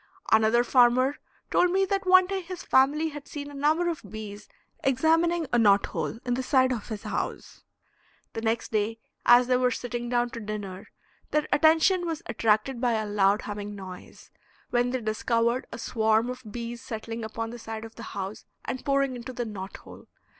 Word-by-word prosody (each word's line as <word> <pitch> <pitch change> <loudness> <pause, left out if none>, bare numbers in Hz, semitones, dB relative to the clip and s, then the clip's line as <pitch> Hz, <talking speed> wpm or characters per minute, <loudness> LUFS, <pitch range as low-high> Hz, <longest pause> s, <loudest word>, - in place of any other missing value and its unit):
Another 220 +2 +5
farmer 255 +2 +4 0.3
told 360 - +4
me 385 +2 +2
that 390 0 -2
one 370 0 +7
day 385 +1 -3
his 360 0 -8
family 290 +5 +3
had 295 -1 -9
seen 290 -1 -7
a - - -11
number 305 +5 +1
of 335 -3 -2
bees 205 0 -9 0.3
examining 325 +5 +2
a 240 - +4
knot 205 -3 +5
hole - - -4
in 245 - 0
the 255 - -1
side 260 0 +3
of 225 -4 -5
his 215 -2 -5
house; - - -4 0.7
the 225 - -4
next 225 +1 -1
day 220 +1 0 0.3
as 245 +1 +8
they 250 0 +2
were 250 0 +3
sitting 240 0 -4
down 240 0 +1
to 230 - -6
dinner 205 -3 -6 0.4
their 300 0 0
attention 325 +4 +4
was 325 -2 -4
attracted 225 +3 +1
by 245 -2 +2
a 215 -1 0
loud 205 0 +2
humming 205 0 -5
noise, 185 -2 -11 0.4
when 245 0 +2
they 255 0 -2
discovered 230 +3 0
a - - -6
swarm 220 0 +1
of 250 -4 -9
bees 235 +1 -6
settling 225 0 -6
upon 225 +1 -4
the 240 - -8
side 225 0 -6
of 225 - -11
the 230 - -11 0.2
house 195 +2 -5 0.2
and 255 - -4
pouring 275 -2 +1
into 245 +1 -7
the 240 -1 -3
knot 195 -3 -7
hole. - - -14
240 Hz, 190 wpm, -27 LUFS, 220-275 Hz, 0.7 s, as